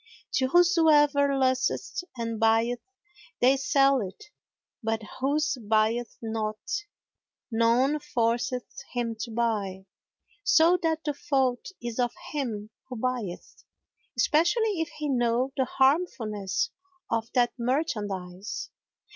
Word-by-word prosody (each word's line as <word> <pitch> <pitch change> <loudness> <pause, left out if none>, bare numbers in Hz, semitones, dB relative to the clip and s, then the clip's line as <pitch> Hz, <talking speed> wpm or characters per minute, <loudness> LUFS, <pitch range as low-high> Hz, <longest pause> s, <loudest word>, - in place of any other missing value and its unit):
To 260 - +2
whosoever 295 -4 +4
lusteth 260 - 0
and 230 -1 -3
buyeth, 225 +2 +2 0.6
they 255 +2 +5
sell 275 0 +3
it, 195 +9 -8 0.5
but 225 -1 -1 0.2
whoso 285 0 0
buyeth 220 +2 +1
not, 220 -1 -2 0.9
none 235 +6 +3
forceth 240 0 -1 0.3
him 235 -2 -1
to 235 - -4
buy; 210 -5 -1 0.6
so 340 +1 +5
that 320 -1 0
the 295 - -1
fault 270 -5 0 0.2
is 240 0 -4
of 245 -1 +1 0.2
him 225 -8 -3 0.2
who 250 - -5
buyeth, 235 -6 -4 0.5
especially 345 - +2
if 325 - -2
he 300 0 -2
know 250 0 +1
the 265 - +1
harmfulness 265 - +1 0.4
of 230 0 0
that 245 -1 +3
merchandise. 205 - -2
250 Hz, 110 wpm, -27 LUFS, 225-285 Hz, 0.9 s, they